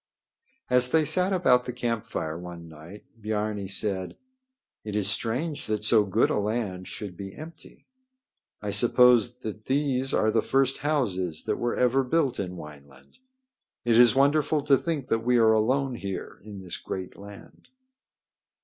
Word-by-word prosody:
As 125 0 +2
they 160 +2 +3
sat 185 +5 +1
about 130 -10 +3
the - - -4
campfire 115 -9 -3
one 85 -1 -9
night, 80 +6 -13 0.2
Biarni 105 -1 -3
said: 95 -2 -1 0.7
"It 105 -1 -5
is 105 -2 0
strange 140 +8 -2
that 105 -1 -2
so 105 -1 +4
good 95 - +1
a - - 0
land 100 -4 -3
should 100 -4 -7
be 95 +1 -8
empty. 160 +1 -12 0.8
I 105 - -2
suppose 125 +1 +4
that 110 -1 -7
these 135 -1 0
are 110 - +2
the 110 - +2
first 135 +2 +1
houses 95 - -1
that - - -2
were 120 0 -1
ever 125 +2 +2
built 135 -1 0
in 90 -2 -4
Wineland. 70 - -14 0.7
It 120 -1 +3
is 120 +1 +6
wonderful 145 +2 +2
to 140 -1 +5
think 150 -1 -3
that 115 - +1
we 125 +1 +3
are 110 -1 +5
alone 130 +5 +1
here 100 -5 -6
in 100 -2 -9
this 90 -2 -6
great 95 -1 -6
land." 100 0 -14
115 Hz, 160 wpm, -26 LUFS, 100-130 Hz, 0.8 s, is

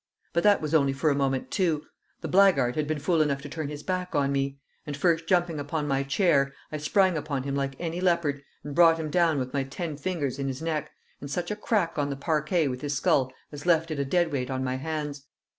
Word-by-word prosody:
But 170 - +2
that 205 +2 +4
was 155 0 -3
only 140 -4 +4
for 150 +3 +1
a - - +1
moment, 135 -2 -1
too; 165 -6 +1 0.4
the - - -4
blackguard 180 -11 +4
had 150 -1 -1
been 155 0 -1
fool 160 +2 +1
enough 140 -2 0
to 145 - -7
turn 155 0 -4
his 150 0 -7
back 180 -2 -2
on 140 -1 +2
me; 140 0 -1 0.3
and, 145 -2 -5
first 165 +1 +1
jumping 175 -4 +2
upon 150 +1 -2
my 135 -1 +1
chair, 140 -1 +2 0.2
I 155 - -3
sprang 185 +3 +2
upon 145 -3 -3
him 140 0 -3
like 135 -1 -2
any 170 +1 -3
leopard, 170 -6 +1 0.2
and 145 - -6
brought 165 +1 +6
him 155 -2 -4
down 170 -2 +3
with 130 -1 -3
my 140 -1 +1
ten 150 +4 -5
fingers 145 -5 -2
in 135 - -1
his 130 -1 -3
neck, 160 -2 -2 0.3
and 140 - -7
such 175 +6 -2
a - - -1
crack 205 -7 0
on 145 0 0
the 140 - -2
parquet 155 +2 +1
with 125 -1 -4
his 145 -1 -2
skull 130 -1 +2 0.2
as 145 +3 -8
left 165 -1 +3
it 150 - -3
a - - +2
deadweight 140 -4 0
on 130 0 -2
my 130 0 -1
hands. 150 -1 -4
150 Hz, 240 wpm, -27 LUFS, 140-170 Hz, 0.4 s, brought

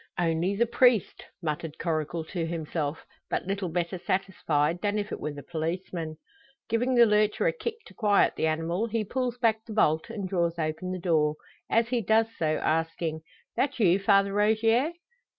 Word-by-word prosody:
"Only 175 +2 +1
the 235 +4 +3
priest!" 240 -3 +2 0.2
muttered 155 0 -3
Coracle 160 0 -2
to 165 0 -3
himself, 160 -2 -3 0.2
but - - -1
little 195 -1 -2
better 175 +2 -2
satisfied 170 -4 0
than 205 0 0
if 210 +1 -3
it - - -4
were 150 - -3
the 145 -1 -9
policeman. 165 0 -4 0.5
Giving 245 +3 +1
the 240 -1 +8
lurcher 210 - +2
a - - +3
kick 465 -2 -4
to - - -14
quiet 205 -3 +3
the 160 - 0
animal, 165 +7 -1
he 225 0 -1
pulls 250 +3 -2
back 220 -3 +1
the 220 - -8
bolt, 160 -4 +2
and 210 -4 -4
draws 170 -2 0
open 160 +3 -2
the 185 - -2
door, 155 -4 +1 0.3
as 230 +1 +2
he 245 -1 +1
does 220 +2 +3
so 155 -1 +1
asking, 165 0 -1 0.3
"That 280 -1 0
you, 190 -3 +4
Father 195 0 +3
Rogier?" 225 +8 +2
185 Hz, 175 wpm, -27 LUFS, 165-220 Hz, 0.5 s, the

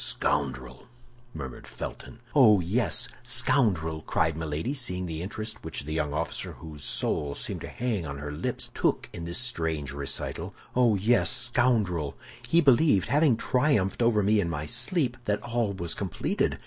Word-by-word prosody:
"Scoundrel!" 65 0 -1 0.4
murmured 65 - -8
Felton. 115 - -8
"Oh, 110 -8 +7
yes, 100 +8 +1
scoundrel!" 80 - +1
cried 80 0 0
Milady, 80 - -3
seeing 90 -10 0
the 80 -2 -4
interest 110 +4 -4
which - - -4
the 75 +2 -5
young 75 -2 -1
officer, 75 - -3
whose 75 -3 -10
soul 70 -1 -1
seemed - - -5
to - - -6
hang 110 -9 -2
on 70 0 -5
her 75 +1 -5
lips, 75 - -2
took - - 0
in 85 - -6
this 85 0 -1
strange 80 - -1
recital. 70 -1 -4 0.2
"Oh, 120 -4 +4
yes, 110 +5 +3
scoundrel! 115 - +2 0.3
He 170 - +5
believed, 135 - +4
having 145 -4 +4
triumphed 125 -7 +1
over 115 -3 +3
me 105 +2 +3
in 85 -4 0
my 75 -2 -3
sleep, 120 - +1
that 105 0 -1
all 120 -3 0
was 85 -4 -3
completed. 95 -4 -1
95 Hz, 160 wpm, -27 LUFS, 80-120 Hz, 0.4 s, Oh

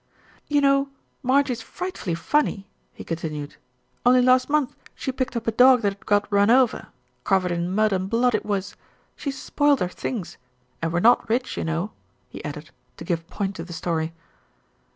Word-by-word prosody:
"You 290 -1 +2
know 275 0 +3 0.3
Marjie's 260 -2 +2
frightfully 355 - -4
funny," 200 - 0 0.3
he - - -10
con 165 - -3
tinued. 150 -3 -6 0.5
"Only 250 0 +5
last 255 +1 +4
month 295 -3 +1 0.2
she 265 - -3
picked 260 -1 -3
up 230 -1 -3
a 225 - +1
dog 250 +1 +6
that 200 -1 +2
had 195 - -22
got 205 -1 +3
run 200 +1 +4
over, 250 0 +3 0.4
covered 185 -2 +1
in 170 0 -1
mud 215 +2 +2
and 190 0 -1
blood 240 +2 +2
it 215 - 0
was. 200 -2 -3 0.4
She 285 - -4
spoilt 285 +1 +1
her 180 - 0
things 190 +1 -5 0.4
and 165 -1 -1
we're 170 +1 0
not 235 +1 +4
rich, 250 +3 0
you - - -3
know," 165 +6 -2 0.4
he - - -9
added, - - -7 0.3
to - - -8
give 165 -2 -2
point 200 0 -3
to 165 - -5
the 175 0 -9
story. 165 -1 -2
215 Hz, 185 wpm, -24 LUFS, 180-255 Hz, 0.5 s, dog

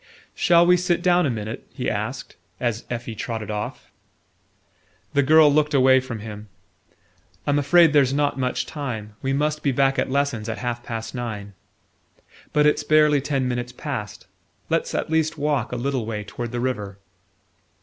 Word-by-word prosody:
"Shall 170 0 +4
we 180 +1 +5
sit 175 -1 0
down 180 -2 +4
a - - 0
minute?" 110 -2 -5
he - - -3
asked, - - -4 0.2
as 120 -2 -2
Effie 120 -1 -4
trotted 110 -1 -4
off. 105 0 -5 1.2
The 140 - +4
girl 150 +1 +6
looked 150 0 +2
away 130 0 +6
from 125 -4 -6
him. 105 -1 -9 1.0
"I'm 145 0 +2
afraid 160 +2 +5
there's 140 -3 +4
not 145 -1 0
much 125 -1 -1
time; 120 -9 -5
we 135 - -1
must 150 +2 0
be 140 - +1
back 135 +1 +2
at - - 0
lessons 130 -5 -1
at 110 - -3
half 120 -1 -3
past 115 -1 -6
nine." 110 -5 -5 1.0
"But 150 0 +3
it's 150 - +3
barely 150 -2 +4
ten 135 -2 -1
minutes 120 0 -3
past. 125 -5 -6 0.5
Let's - - 0
at - - -2
least 160 0 +1
walk 145 -5 0
a - - -3
little 125 -2 -2
way 105 -2 -3
toward 115 +3 -6
the 120 - -3
river." 105 -6 -3
130 Hz, 170 wpm, -23 LUFS, 115-150 Hz, 1.2 s, girl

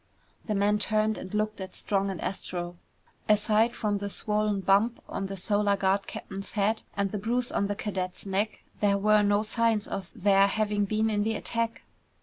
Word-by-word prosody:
The 215 - 0
man 205 +1 +2
turned 215 0 +1
and 185 - -8
looked 215 -1 -1
at 190 0 -7
Strong 195 -1 0
and 190 -3 -4
Astro. 175 -2 -4 0.5
Aside 215 +2 +3
from 205 -2 -1
the 200 0 -3
swollen 210 -1 0
bump 200 +5 +3
on 195 - -3
the 195 0 -6
Solar 205 +1 +2
Guard 195 +1 +1
captain's 195 0 -7
head 215 +1 +1 0.2
and 200 -1 0
the 210 - -2
bruise 240 +4 -1
on 200 - 0
the 205 - -2
cadet's 190 -3 -4
neck 200 +2 -1 0.2
there 200 -1 +3
were 210 +1 +4
no 205 0 +3
signs 225 -1 +1
of 190 -2 -5
their 195 0 +4
having 210 0 0
been 215 +2 +1
in 205 -1 +1
the 220 +1 0
attack. 230 +2 -2
205 Hz, 185 wpm, -28 LUFS, 195-215 Hz, 0.5 s, were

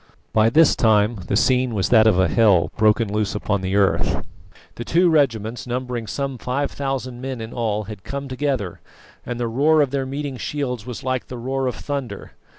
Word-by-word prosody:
By 110 +1 +4
this 155 +3 +5
time 110 0 +3
the - - 0
scene 125 +1 +2
was 95 -2 0
that 110 -2 +6
of 105 -5 +4
a 95 0 +4
hell 105 -7 +3
broken 110 -1 +2
loose 105 -1 -1
upon 105 -1 -1
the 95 +1 -2
earth. 100 -8 +1 0.5
The 120 - -6
two 170 +7 +3
regiments, 120 -6 0
numbering 125 -2 -3
some 135 +3 -3
5000 130 -1 -3
men 130 -2 -4
in 110 0 -7
all, 110 -3 -1
had 105 -2 -9
come 140 0 -5
together, 130 - -2 0.5
and 120 0 -4
the 120 - -1
roar 145 +7 +3
of 140 -3 +2
their 135 -1 -1
meeting 140 0 -4
shields 125 -5 -4
was 125 - -6
like 130 -1 -2
the 125 - -7
roar 130 +2 -2
of 125 - -2
thunder. 140 -4 -5
125 Hz, 190 wpm, -22 LUFS, 110-135 Hz, 0.5 s, that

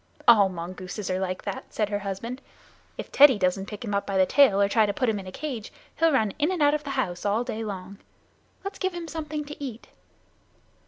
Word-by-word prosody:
"All 210 -5 +7
mongooses 185 +3 -6
are 185 - 0
like 185 -1 -3
that," 200 -2 -5
said 210 -2 -1
her 205 -1 -1
husband. 205 +6 -5 0.6
"If - - -7
Teddy 280 -4 +7
doesn't 190 +1 0
pick 210 +2 -7
him 205 - -3
up 200 - -1
by 195 -1 -1
the 190 - +5
tail, 215 -2 +5
or 200 - +4
try 215 +1 +3
to 205 - -1
put 255 - 0
him 215 -3 +1
in 190 - -9
a - - -6
cage, 250 -4 -5 0.3
he'll 330 0 +4
run 220 -8 +2
in 305 +5 +2
and 365 - -2
out 290 -1 +4
of 300 0 -1
the 285 - -6
house 180 -8 -2
all 210 +3 +1
day 225 -2 -4
long. 195 -1 -7 0.6
Let's 395 - -6
give 375 -2 -1
him 340 -1 -5
something 305 -2 -4
to 290 0 -8
eat." 245 -4 -7
215 Hz, 230 wpm, -26 LUFS, 195-285 Hz, 0.6 s, All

